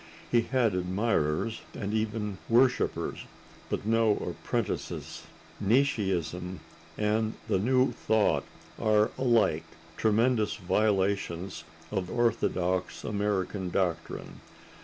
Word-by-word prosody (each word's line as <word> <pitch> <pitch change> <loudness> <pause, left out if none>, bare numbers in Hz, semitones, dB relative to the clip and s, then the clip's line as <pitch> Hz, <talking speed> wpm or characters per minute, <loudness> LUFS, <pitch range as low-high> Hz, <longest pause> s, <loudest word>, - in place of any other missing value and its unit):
He 120 - +5
had 120 -3 +1
admirers 95 +1 0
and 100 0 -3
even 105 -2 -2
worshipers, 125 +2 +2 0.5
but - - -2
no 115 -1 +3
apprentices. - - -3 0.4
Nietzscheism 95 - +1 0.4
and 110 +1 +1
the - - +2
New 130 +5 +3
Thought 110 -1 +2 0.4
are 110 -1 +3
alike 120 -4 +2 0.3
tremendous 110 0 +2
violations 95 -2 0 0.3
of 95 -3 -2
orthodox 95 -6 0
American 100 -2 -1
doctrine. 85 -3 -2
105 Hz, 90 wpm, -29 LUFS, 95-115 Hz, 0.5 s, He